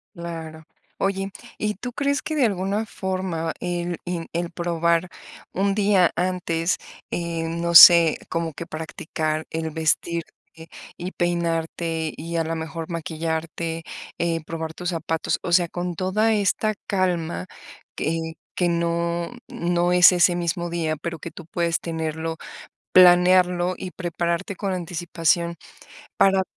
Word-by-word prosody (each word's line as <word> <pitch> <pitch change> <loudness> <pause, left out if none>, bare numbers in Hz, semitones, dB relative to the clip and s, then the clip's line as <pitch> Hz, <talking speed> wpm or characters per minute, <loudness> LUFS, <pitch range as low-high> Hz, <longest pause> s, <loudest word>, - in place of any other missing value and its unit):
Claro. 165 -2 -7 0.4
Oye, 195 0 0 0.3
¿y 210 0 -1
tú 245 +6 -6
crees 280 +2 0
que 315 - -3
de 290 -4 +3
alguna 200 +2 -1
forma 185 -5 -3
el 175 -1 -2
en 175 -2 -3
el 170 0 -2
probar 170 0 0 0.4
un 195 +1 +1
día 200 -4 +4
antes, 175 -2 0 0.3
eh, 170 -1 -2
no 170 +1 -2
sé, 170 -1 +10
como 165 -1 -2
que 170 - -7
practicar 155 0 -3
el 160 0 -3
vestirte 160 +1 0 0.7
y 180 +2 -5
peinarte 165 -2 -1
y 165 +2 -6
a 165 - +2
la 165 0 -3
mejor 160 +1 -5
maquillarte, 165 0 -3 0.3
eh, 170 -1 0
probar 160 0 -5
tus 180 - -5
zapatos, 165 -2 -1
o 175 - -3
sea, 175 -1 +4
con 175 0 -4
toda 200 +6 +1
esta 215 +1 +1
calma 175 - -1 0.5
que 160 +1 -2 0.2
que 175 -1 +2
no 170 0 -1 0.2
no 175 +1 0
es 180 0 +8
ese 175 -1 +4
mismo 175 0 -1
día, 165 -2 -1
pero 165 +1 -5
que 170 - -6
tú 160 +1 -11
puedes 170 0 0
tenerlo, 160 0 -3 0.5
planearlo 180 0 +6
y 185 - -6
prepararte 175 +2 -2
con 195 0 -2
anticipación 170 -1 0 0.6
para 190 -1 +4
170 Hz, 135 wpm, -23 LUFS, 165-180 Hz, 0.7 s, sé